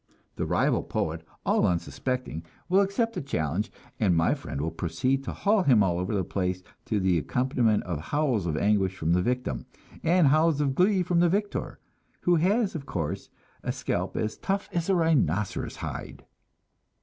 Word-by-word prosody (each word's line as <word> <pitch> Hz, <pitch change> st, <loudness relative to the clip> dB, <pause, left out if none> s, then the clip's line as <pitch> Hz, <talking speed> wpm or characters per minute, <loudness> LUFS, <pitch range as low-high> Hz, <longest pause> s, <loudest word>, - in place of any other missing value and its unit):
The -, -, -2 dB
rival -, -, +2 dB
poet, 80 Hz, +1 st, -3 dB, 0.2 s
all -, -, +3 dB
unsuspecting, 90 Hz, +1 st, -2 dB, 0.2 s
will 190 Hz, +2 st, +4 dB
accept 215 Hz, +4 st, 0 dB
the 185 Hz, -, -3 dB
challenge, 95 Hz, -, -2 dB, 0.3 s
and 95 Hz, -6 st, +3 dB
my 80 Hz, 0 st, +3 dB
friend -, -, -5 dB
will 80 Hz, +3 st, -1 dB
proceed 85 Hz, +12 st, -1 dB
to -, -, -3 dB
haul 210 Hz, 0 st, +2 dB
him 125 Hz, -, +5 dB
all 90 Hz, -2 st, +1 dB
over 95 Hz, +4 st, -1 dB
the 95 Hz, -, +1 dB
place, 90 Hz, 0 st, -2 dB, 0.2 s
to 105 Hz, -, 0 dB
the 95 Hz, -3 st, +2 dB
accompaniment 120 Hz, -, +1 dB
of 85 Hz, -5 st, -3 dB
howls 125 Hz, -, 0 dB
of 80 Hz, -2 st, -1 dB
anguish 95 Hz, -1 st, +2 dB
from 85 Hz, -2 st, 0 dB
the 90 Hz, -, +3 dB
victim, 125 Hz, -, -2 dB, 0.3 s
and 170 Hz, -2 st, +4 dB
howls 155 Hz, +1 st, +3 dB
of 140 Hz, -2 st, +1 dB
glee 185 Hz, +4 st, +3 dB
from 175 Hz, -1 st, +1 dB
the 175 Hz, 0 st, +4 dB
victor, 205 Hz, +3 st, -2 dB, 0.4 s
who 175 Hz, -1 st, +3 dB
has, 200 Hz, +6 st, +2 dB
of 150 Hz, -3 st, -6 dB
course, 85 Hz, +2 st, -3 dB, 0.3 s
a -, -, -2 dB
scalp -, -, -2 dB
as 110 Hz, 0 st, -2 dB
tough 195 Hz, +1 st, -2 dB
as 170 Hz, +1 st, -1 dB
a 190 Hz, -, +4 dB
rhinoceros 160 Hz, -, +1 dB
hide. -, -, -7 dB
125 Hz, 175 wpm, -27 LUFS, -, 0.4 s, him